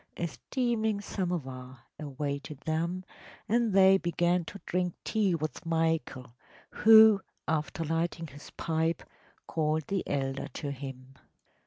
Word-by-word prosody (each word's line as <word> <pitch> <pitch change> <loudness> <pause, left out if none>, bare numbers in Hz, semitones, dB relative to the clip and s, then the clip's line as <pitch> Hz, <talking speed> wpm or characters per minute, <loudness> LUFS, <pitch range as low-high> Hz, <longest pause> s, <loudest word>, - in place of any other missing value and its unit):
A 170 - -1
steaming 220 - -1
samovar 135 - -4 0.2
awaited 140 0 -5
them, 170 +4 -2 0.4
and 230 0 +2
they 190 0 +6
began 175 0 +1
to 200 - -9
drink 180 -1 -1
tea 205 -5 +1
with 155 -3 -4
Michael, 160 -7 -1 0.4
who, 220 -2 +7 0.3
after 160 +1 -1
lighting 165 +1 -1
his 145 -1 -12
pipe, 160 0 -1 0.4
called 155 -1 0
the 195 -2 0
elder 135 -1 -2
to 145 -2 -3
him. 135 -1 -9
165 Hz, 120 wpm, -30 LUFS, 145-190 Hz, 0.4 s, who